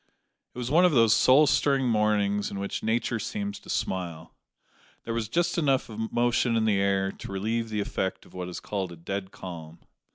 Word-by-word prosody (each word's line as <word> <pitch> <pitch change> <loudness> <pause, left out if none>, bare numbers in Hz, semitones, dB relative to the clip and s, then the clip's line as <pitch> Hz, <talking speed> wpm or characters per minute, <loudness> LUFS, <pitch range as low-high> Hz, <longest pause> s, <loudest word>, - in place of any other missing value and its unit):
It - - -12
was 125 +1 -3
one 170 +4 +5
of 180 -3 +4
those 115 -4 +5
soul 140 +4 +6
stirring 135 -2 +2
mornings 105 -2 +1
in 100 - -6
which 100 0 -3
Nature 115 +1 0
seems 205 - -4
to - - -16
smile. 90 -7 -3 0.7
There 115 - -4
was 115 -2 -2
just 175 +4 +1
enough 135 -6 +1
of 110 0 -4
motion 120 0 +2
in 110 - +1
the 105 -3 +2
air 95 -1 +1
to - - -10
relieve 110 +4 -2
the 105 -1 -1
effect 95 -1 -3
of - - -19
what 90 -1 -5
is 90 - -6
called 95 -3 -4
a - - -8
dead 95 +3 -4
calm. 85 -4 -9
110 Hz, 200 wpm, -27 LUFS, 95-120 Hz, 0.7 s, soul